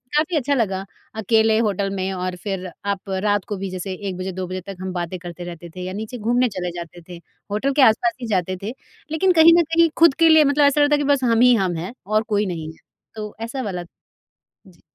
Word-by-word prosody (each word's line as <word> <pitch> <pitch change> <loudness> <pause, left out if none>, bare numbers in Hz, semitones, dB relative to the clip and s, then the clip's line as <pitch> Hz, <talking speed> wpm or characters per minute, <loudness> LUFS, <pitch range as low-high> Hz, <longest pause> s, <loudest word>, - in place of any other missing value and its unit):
काफ़ी 310 +2 +1
अच्छा 285 +1 0
लगा 195 -5 -1 0.3
अकेले 220 0 +2
होटल 200 -3 0
में 190 0 -2
और 185 0 -3
फिर 195 -3 -3 0.2
आप 200 -1 -3 0.2
रात 205 -2 +2
को 205 - -4
भी 195 0 -4
जैसे 185 +1 -5 0.2
1 180 - -5
बजे 185 +1 -4
2 185 0 -5
बजे 185 0 -5
तक 195 - -7
हम 185 -1 -4
बातें 175 +1 -4
करते 175 0 -8
रहते 170 -1 -8
थे 185 - -7
या 185 - -5
नीचे 220 +4 -6
घूमने 245 +3 +1
चले 180 -3 -4
जाते 170 +1 -9
थे 175 - -8 0.3
होटल 265 +7 0
के 290 - +3
आस 220 -4 +7
पास 235 -1 +2
ही 235 - -4
जाते 185 -3 -1
थे 220 +5 -4 0.4
लेकिन 365 +4 +2
कहीं 330 +1 +8
न - - +4
कहीं 335 0 +5
ख़ुद 335 -4 +7
के 330 0 +6
लिए 315 -1 +7
मतलब 285 +1 +3
ऐसा 285 +1 +3
लगता 290 0 +4
है - - +1
कि 280 - -2
बस 270 -2 -1
हम 230 -1 +3
ही 250 0 +7
हम 185 -4 0
हैं 180 +8 -5
और 215 +2 +1
कोई 205 0 +2
नहीं 160 -3 -5
है 160 - -19 0.4
तो 210 -1 -6
ऐसा 240 +4 -4
वाला 180 -6 -4 0.8
जी। 180 -3 -20
205 Hz, 245 wpm, -21 LUFS, 185-250 Hz, 0.8 s, कहीं